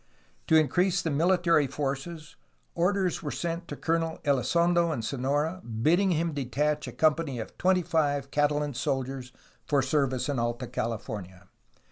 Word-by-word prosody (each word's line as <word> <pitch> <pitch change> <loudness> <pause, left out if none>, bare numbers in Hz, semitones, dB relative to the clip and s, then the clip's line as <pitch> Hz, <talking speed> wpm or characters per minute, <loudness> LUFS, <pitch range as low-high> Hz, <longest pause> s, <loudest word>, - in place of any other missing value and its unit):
To 160 - +4
increase 180 +4 +3
the 160 - -1
military 170 -1 +3
forces 145 +4 -4 0.4
orders 180 +1 +1
were 150 - -4
sent 170 +2 -3
to - - -5
Colonel 165 0 -1
Elizondo 170 +5 +2
in 120 -7 -3
Sonora 145 +8 -1
bidding 155 - +2
him 165 -1 0
detach 145 +2 -1
a - - -5
company 155 -4 +1
of 110 - -7
twenty 185 0 +3
five 145 -4 0
Catalan 145 0 +1
soldiers 130 0 -3 0.4
for 140 -2 +2
service 130 -2 0
in 140 -4 -1
Alta 120 +2 -2
California. 105 -6 -5
150 Hz, 140 wpm, -28 LUFS, 135-170 Hz, 0.4 s, To